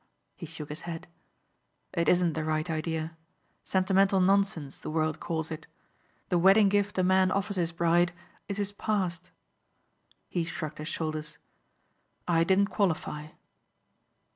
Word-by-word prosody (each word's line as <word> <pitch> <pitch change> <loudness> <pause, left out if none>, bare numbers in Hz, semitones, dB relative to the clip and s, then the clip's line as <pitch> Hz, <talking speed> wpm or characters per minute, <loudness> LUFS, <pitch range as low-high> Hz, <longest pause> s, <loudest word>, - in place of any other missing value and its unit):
He 170 - -8
shook 150 -2 -8
his 150 +3 -6
head. 165 0 -6 0.9
"It 170 -2 +2
isn't 175 -2 +3
the 160 - -2
right 155 +1 0
idea. 160 0 -2 0.5
Sentimental 190 +1 +3
nonsense 185 -7 +1
the - - -6
world 155 0 0
calls 160 -2 -3
it. 155 0 -6 0.6
The 175 - +3
wedding 195 +3 +6
gift 205 0 +1
a 185 - +3
man 185 0 +4
offers 200 +1 -1
his 170 -2 0
bride 170 +1 +3 0.4
is 200 - -3
his 205 -1 -1
past." 190 -4 -2 1.0
He 175 - -1
shrugged 155 -2 -5
his 155 - -5
shoulders. 155 -2 -4 0.9
"I 165 -2 +4
didn't 195 +3 +3
qualify." 160 -6 -1
170 Hz, 140 wpm, -29 LUFS, 160-195 Hz, 1.0 s, wedding